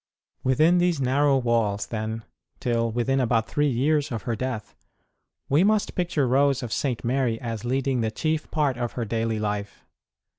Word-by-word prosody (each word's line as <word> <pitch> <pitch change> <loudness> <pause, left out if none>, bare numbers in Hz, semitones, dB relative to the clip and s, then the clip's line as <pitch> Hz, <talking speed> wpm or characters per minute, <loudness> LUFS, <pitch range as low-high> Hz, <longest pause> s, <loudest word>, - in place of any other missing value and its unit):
Within 155 +7 +4
these 175 -3 +2
narrow 135 +2 +3
walls, 115 -5 +1
then, 110 0 -4 0.4
till 115 -1 0
within 125 +4 0
about 115 -3 +1
three 145 0 +1
years 145 +4 +1
of 115 -3 -4
her 120 - -1
death, 120 -3 -4 0.7
we 145 +6 +4
must 215 +1 +2
picture 170 -6 0
Rose 135 +1 +2
of 120 - -4
St. 130 -5 -1
Mary 120 -2 0
as 115 -2 -5
leading 130 0 0
the 110 - 0
chief 155 +7 -2
part 145 -5 0
of 120 -1 -2
her 120 - -3
daily 115 0 -1
life. 105 -1 -4
125 Hz, 165 wpm, -25 LUFS, 115-140 Hz, 0.7 s, Within